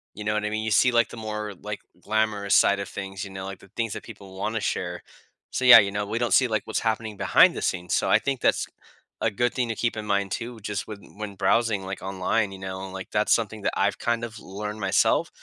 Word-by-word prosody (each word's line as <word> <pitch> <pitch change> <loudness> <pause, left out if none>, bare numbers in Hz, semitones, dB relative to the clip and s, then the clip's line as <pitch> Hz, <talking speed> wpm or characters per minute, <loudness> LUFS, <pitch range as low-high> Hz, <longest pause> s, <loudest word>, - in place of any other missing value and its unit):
you 105 - -6
know 105 - 0
what 105 0 -1
I 105 - 0
mean? 110 0 -2
You 110 - -2
see, 125 +4 +5
like, 115 0 +3
the - - -10
more, 105 -1 -4
like, 105 0 -5 0.2
glamorous 105 -2 +1
side 100 0 +5
of 100 - -4
things, 95 0 -6
you 100 - -8
know, 95 0 -6
like, 95 0 -7
the 100 - -17
things 115 -3 -1
that - - -7
people 100 -4 -12
wanna 110 +2 -2
share, - - -3 0.5
so, 130 - -1
yeah, 125 - +11
you 100 -1 +1
know, 105 0 -2
we 110 +3 -3
don't 120 -1 +1
see, 130 - +5
like, 110 -3 -1
what's - - -1
happening 110 -2 -2
behind - - +5
the - - -4
scenes, 90 -1 -1
so, - - +1
I - - +6
think 135 -2 -2
that's - - +2 0.6
a 115 - +2
good 120 +4 0
thing 125 -3 -1
to 115 - -2
keep 120 +1 -1
in 105 - -3
mind 100 -2 0
too 120 0 -5
just 105 0 -4
when 100 -2 -11
when 105 -2 -6
browsing, 110 -1 +1
like, 95 +1 -5
online. 95 +2 -1
You 95 - -8
know, 95 0 -6
like, 95 -1 -8
that's - - +3
something - - -1
that - - 0
I've - - +1
kind 120 0 0
of 115 -1 -6
learned 105 +2 -6
myself. 95 -1 +2
105 Hz, 255 wpm, -25 LUFS, 100-115 Hz, 0.6 s, yeah